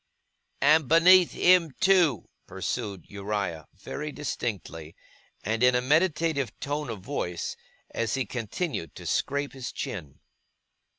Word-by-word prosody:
' - - -51 0.2
And 155 0 +5
beneath 175 +3 +6
him 175 -5 +4
too,' 185 - +3 0.2
pursued 100 -8 -4
Uriah, 100 -5 -4
very 150 +1 -6
distinctly, 95 - -5 0.5
and 110 +3 -1
in 125 0 +5
a - - +4
meditative 150 - +1
tone 145 -1 -3
of 110 -4 -6
voice, 90 - -4 0.4
as 115 +2 -1
he 135 -2 -1
continued 115 - -4
to - - -10
scrape 140 +1 -1
his 130 -2 -6
chin. 75 -9 -6
130 Hz, 125 wpm, -27 LUFS, 105-155 Hz, 0.5 s, beneath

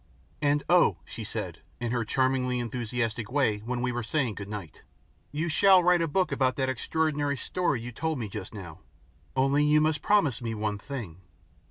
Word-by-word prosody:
"And 145 0 +2
oh!" 175 - +5
she - - -7
said, - - -5 0.2
in 120 -1 -2
her 120 -1 0
charmingly 130 +1 +1
enthusiastic 115 -1 -2
way 130 -7 +2
when 120 +3 -3
we 125 - +1
were 120 0 -2
saying 125 -1 0
goodnight, 100 -5 -7 0.5
"you 155 +3 -1
shall 185 +2 +6
write 175 0 +4
a 165 - +1
book 185 +5 +1
about 130 -2 +1
that 130 -1 0
extraordinary 145 +2 0
story 145 -3 -1
you 120 +1 -6
told 160 +5 -2
me 115 -4 -3
just 95 -1 -7
now. 90 -7 -9 0.6
Only 135 +2 +3
you 150 +1 +5
must 155 -1 +1
promise 155 - +2
me 115 -1 -3
one 105 -1 -2
thing." 105 - -7
130 Hz, 180 wpm, -28 LUFS, 115-150 Hz, 0.6 s, shall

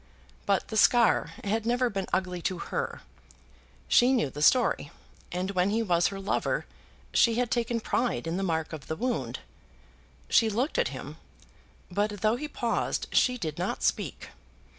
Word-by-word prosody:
But 200 -1 +1
the 220 - -2
scar 235 +1 +4
had 215 +2 0
never 245 +2 +1
been 195 -5 -3
ugly 180 -1 -1
to 185 +2 -1
her. - - -4 0.8
She 250 +2 +5
knew 190 - +1
the 145 - -7
story, 250 +11 +3 0.4
and 185 +2 -2
when 185 0 +1
he 225 +2 +1
was 175 -4 +3
her 195 - -5
lover 195 - -1 0.5
she 230 -2 +4
had 245 0 0
taken 235 -1 0
pride 235 -1 -1
in 165 +1 -2
the 190 - -1
mark 160 -4 -1
of 150 -4 -8
the 160 - -2
wound. 245 +5 -2 0.9
She 225 - +4
looked 250 - 0
at - - +2
him, - - -7 0.7
but 205 +2 -1
though 215 +1 +3
he 300 +5 -4
paused 240 -5 -2
she 250 -1 +3
did 160 -8 -4
not 180 - -2
speak. - - -1
210 Hz, 165 wpm, -28 LUFS, 180-240 Hz, 0.9 s, She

